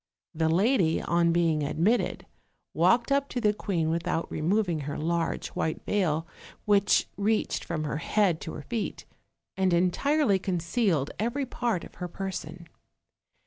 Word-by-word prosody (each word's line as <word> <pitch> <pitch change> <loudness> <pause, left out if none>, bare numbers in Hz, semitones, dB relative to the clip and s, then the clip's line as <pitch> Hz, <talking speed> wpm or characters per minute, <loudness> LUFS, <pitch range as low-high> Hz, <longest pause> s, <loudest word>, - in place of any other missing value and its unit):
The 160 0 +1
lady, 185 -1 +3
on 170 0 +2
being 165 -2 +2
admitted, 170 +11 0 0.5
walked 235 +2 +3
up 280 0 +2
to 250 - -2
the 210 -3 +2
queen 170 -6 -1
without 165 0 -2
removing 175 +1 0
her 145 0 -4
large 165 +1 -1
white 160 - -3
veil, 165 -6 0 0.4
which 205 -1 +3
reached 210 +2 0
from 160 -3 -3
her 150 -1 -2
head 180 0 +1
to 160 - -6
her - - -7
feet, 215 - -4 0.5
and 190 -1 +1
entirely 200 - +2
concealed 175 - 0
every 240 +6 -1
part 235 -7 -2
oil - - -13
her 180 - -3
person. 180 -2 -6
180 Hz, 145 wpm, -27 LUFS, 165-215 Hz, 0.5 s, lady